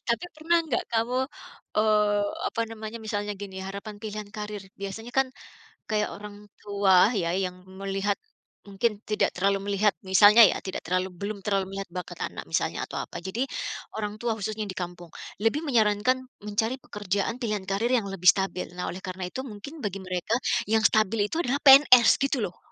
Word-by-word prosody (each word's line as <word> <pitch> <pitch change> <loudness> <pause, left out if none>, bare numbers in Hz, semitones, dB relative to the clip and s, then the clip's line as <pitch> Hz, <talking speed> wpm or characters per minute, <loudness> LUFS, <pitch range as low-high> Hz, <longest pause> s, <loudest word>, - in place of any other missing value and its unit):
Tapi 235 +9 +1
pernah 325 +2 +2
nggak 260 -6 -1
kamu, 230 +3 +1 0.6
eee, 210 -1 +3 0.3
apa - - -4
namanya, 220 0 -7
misalnya 205 -1 -2
gini 195 -1 -8
harapan 200 +2 -7
pilihan 215 -1 -5
karir. 210 -1 -5 0.2
Biasanya 225 +5 -6
kan 270 -1 +3 0.6
kayak 210 -1 +1
orang 205 0 -9 0.2
tua 200 0 +4
ya 180 -7 0
yang 185 -1 -3 0.2
melihat, 195 +1 -1 0.5
mungkin 200 +2 -1
tidak 210 -1 +1
terlalu 195 +1 0
melihat 200 0 +2
misalnya 205 +4 +7
ya - - +6
tidak 190 - -6
terlalu 185 +2 0
belum 200 +3 -5
terlalu 195 -1 -1
melihat 195 0 -5
bakat 180 +1 -7
anak - - -7
misalnya - - 0
atau - - -5
apa, - - -6
jadi 225 +8 -2 0.5
orang 210 -1 -4
tua 235 0 -1
khususnya 215 0 -4
di 190 - -6
kampung 175 -1 -6 0.3
lebih 225 +9 +1
menyarankan 245 -1 +2 0.2
mencari 210 +3 -1
pekerjaan 205 +3 -2
pilihan 215 -5 -2
karir 195 +4 -1
yang 215 -5 0
lebih 185 -2 -6
stabil. 190 0 +4
Nah 180 - -3
oleh 180 - -7
karena 185 -1 -6
itu 260 +6 -5
mungkin 260 +8 -9
bagi 200 -7 -4
mereka 185 +3 -2 0.3
yang 220 +1 +2
stabil 215 -1 +3
itu 320 - -2
adalah 280 -3 0
PNS 265 -4 +8
gitu 275 -3 0
loh. 180 -4 -4
210 Hz, 170 wpm, -26 LUFS, 195-225 Hz, 0.6 s, PNS